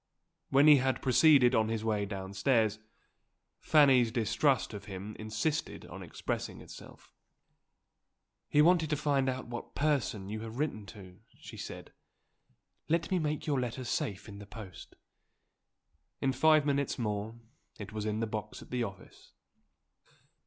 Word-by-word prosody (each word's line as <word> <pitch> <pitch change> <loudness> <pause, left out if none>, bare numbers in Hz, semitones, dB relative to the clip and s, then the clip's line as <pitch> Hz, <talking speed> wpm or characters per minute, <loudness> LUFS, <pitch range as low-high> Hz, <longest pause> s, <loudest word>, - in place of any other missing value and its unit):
When 140 +2 +5
he 150 -2 +9
had 130 0 0
proceeded 135 -1 +5
on 110 -2 +2
his 110 -1 -2
way 105 -2 0
downstairs, 105 +3 0 0.8
Fanny's 135 -6 +5
distrust 120 +3 +1
of 105 - -8
him 100 +2 -7
insisted 110 +9 -2
on - - -10
expressing - - -5
itself. - - -13 1.4
"He 150 - +5
wanted 165 -2 +4
to 150 - +1
find 140 -2 +1
out 130 0 -4
what 120 0 -8
person 140 -9 0
you 110 +2 -4
have 115 +1 -7
written 130 -9 -2
to," 95 -3 -12 0.2
she - - -11
said. - - -8 1.0
"Let 165 +2 0
me 185 - +2
make 150 -1 -2
your 145 -4 +1
letter 125 +1 -3
safe 105 -4 -3
in 100 -1 -10
the 100 - -11
post." 100 -6 -11 1.2
In 135 - +1
five 155 0 +4
minutes 140 -1 0
more 105 -1 -3 0.4
it 105 0 -8
was 105 -1 -3
in 110 +1 -1
the - - +1
box 110 -1 -6
at - - -18
the 125 -1 -1
office. 100 -3 -10
120 Hz, 145 wpm, -31 LUFS, 105-145 Hz, 1.4 s, he